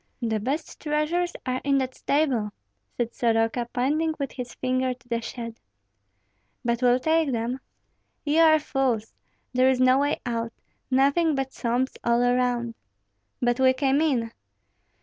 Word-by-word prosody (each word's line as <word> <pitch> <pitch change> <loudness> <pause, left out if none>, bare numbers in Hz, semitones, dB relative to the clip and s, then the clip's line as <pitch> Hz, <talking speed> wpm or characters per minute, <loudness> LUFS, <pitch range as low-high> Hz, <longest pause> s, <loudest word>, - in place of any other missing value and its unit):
"The 220 -2 0
best 275 +9 -3
treasures 310 +4 0
are 255 0 -1
in 275 -1 +2
that 260 -1 -1
stable," 270 -9 0 0.5
said 240 -1 -1
Soroka, 230 +1 +1
pointing 310 +6 0
with 280 -3 -3
his 250 -2 -7
finger 255 0 0
to 250 - -27
the 235 -1 -1
shed. 230 -1 -7 1.1
"But 235 0 0
we'll 245 0 +5
take 315 +1 +2
them?" 240 +2 -2 0.7
"Ye 300 +2 +2
are 315 -1 +7
fools! 265 -7 -1 0.4
there 255 +1 +4
is 260 -1 +2
no 255 +1 +5
way 285 +1 0
out, 230 -1 -2 0.4
nothing 280 +5 +3
but 270 -1 -3
swamps 245 +2 -1
all 235 +1 +3
around." 245 -1 +1 0.7
"But 240 +1 +2
we 260 0 +5
came 270 +2 +2
in." 250 -8 +1
255 Hz, 150 wpm, -25 LUFS, 235-280 Hz, 1.1 s, are